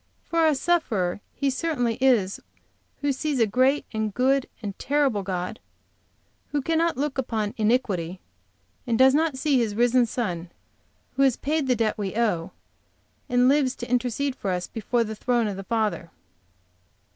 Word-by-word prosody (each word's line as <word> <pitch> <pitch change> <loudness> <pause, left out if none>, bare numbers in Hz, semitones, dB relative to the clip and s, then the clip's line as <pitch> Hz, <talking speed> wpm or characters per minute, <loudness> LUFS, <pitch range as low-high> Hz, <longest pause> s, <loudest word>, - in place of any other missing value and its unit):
For 330 -1 +2
a 305 - +3
sufferer 220 - 0
he 280 -1 0
certainly 255 -6 -1
is 220 -8 +3 0.6
who 285 0 +1
sees 285 0 -2
a 225 - +5
great 260 +6 +2
and 220 -1 -1
good 265 +4 +1
and 200 -2 -3
terrible 275 -7 +1
God 185 +2 -4 0.9
who 295 - 0
cannot 330 +1 +1
look 280 -1 -2
upon 220 -5 -2
iniquity, 205 -6 0 0.7
and 230 -2 +1
does 265 +1 +6
not 305 -2 +1
see 275 -1 +2
His 220 -3 -1
risen 240 +1 +3
Son, 180 -8 -3 0.7
who - - +2
has 265 -3 +4
paid 300 0 -1
the 250 - +3
debt 220 -2 0
we 200 -1 -3
owe, 190 -7 0 0.8
and 245 0 +4
lives 270 -2 +3
to 240 0 -7
intercede 250 +2 0
for 200 - -4
us 180 -1 -1
before 230 +2 -1
the 220 -1 -5
throne 240 +2 0
of 205 - -3
the 195 - -6
Father. 215 -6 -1
245 Hz, 160 wpm, -25 LUFS, 210-275 Hz, 0.9 s, does